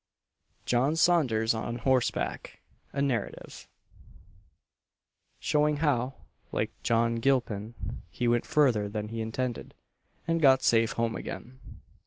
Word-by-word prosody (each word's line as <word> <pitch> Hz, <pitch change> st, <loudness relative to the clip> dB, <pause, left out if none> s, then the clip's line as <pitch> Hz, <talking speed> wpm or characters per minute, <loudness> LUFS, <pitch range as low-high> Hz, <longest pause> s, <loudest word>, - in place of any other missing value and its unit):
JOHN 130 Hz, +6 st, +2 dB
SAUNDERS 130 Hz, -11 st, +3 dB
ON 115 Hz, +1 st, -3 dB
HORSEBACK: 130 Hz, +1 st, -1 dB, 0.3 s
A 140 Hz, -, -1 dB
NARRATIVE; 120 Hz, -7 st, -3 dB, 1.7 s
Showing 150 Hz, 0 st, +2 dB
how, 135 Hz, -4 st, 0 dB, 0.4 s
like -, -, -1 dB
John 115 Hz, 0 st, +1 dB
Gilpin, 115 Hz, -4 st, 0 dB, 0.3 s
he 120 Hz, +8 st, -2 dB
went 120 Hz, 0 st, +1 dB
further 130 Hz, -10 st, +3 dB
than 105 Hz, 0 st, -4 dB
he 115 Hz, 0 st, -4 dB
intended, 120 Hz, +2 st, -4 dB, 0.5 s
and 165 Hz, 0 st, +1 dB
got 135 Hz, -3 st, +5 dB
safe 115 Hz, -1 st, +3 dB
home 115 Hz, -1 st, -1 dB
again. 130 Hz, +2 st, -7 dB
120 Hz, 110 wpm, -28 LUFS, 115-135 Hz, 1.7 s, got